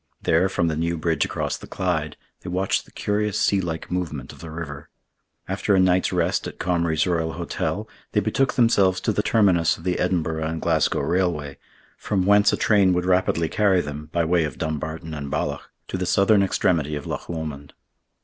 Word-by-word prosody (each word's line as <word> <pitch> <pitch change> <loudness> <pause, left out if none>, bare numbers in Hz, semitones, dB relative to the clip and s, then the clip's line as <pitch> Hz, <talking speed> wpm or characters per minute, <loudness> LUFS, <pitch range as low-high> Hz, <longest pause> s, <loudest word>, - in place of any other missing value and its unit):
There, 90 +4 +2
from 90 -3 0
the 80 - 0
new 85 +2 -1
bridge 80 -1 +1
across - - -3
the - - -12
Clyde, 80 -5 -2 0.2
they - - -7
watched 95 +2 0
the - - -20
curious 105 0 -1
sea 100 -1 +2
like 80 -2 -5
movement 75 -8 -3
of - - -16
the 85 - -8
river. 75 -3 -7 0.6
After 100 +1 +1
a - - +4
night's 95 0 +3
rest - - 0
at - - -9
Comrie's 85 -3 +1
Royal 80 -3 0
Hotel, - - -3 0.3
they - - +3
betook 135 0 +1
themselves 100 -6 +3
to 110 - +1
the 105 - 0
terminus 95 -7 +3
of 80 - -14
the 90 0 -1
Edinburgh 80 -3 0
and 80 0 -3
Glasgow 80 -2 +1
Railway, 85 -6 -1 0.4
from 95 -3 -1
whence 100 +1 +5
a - - 0
train 100 -4 +4
would 90 0 0
rapidly 90 -3 +2
carry 100 0 +2
them, 75 -1 -5
by 85 -1 +1
way 85 0 +2
of 75 - -4
Dumbarton 80 +1 -4
and 70 -2 -5
Balloch, - - -3 0.2
to 95 - -3
the 90 - -2
southern 100 +2 +4
extremity 80 -5 +1
of 75 - -6
Loch - - -5
Lomond. 75 -4 -6
85 Hz, 195 wpm, -23 LUFS, 80-95 Hz, 0.6 s, whence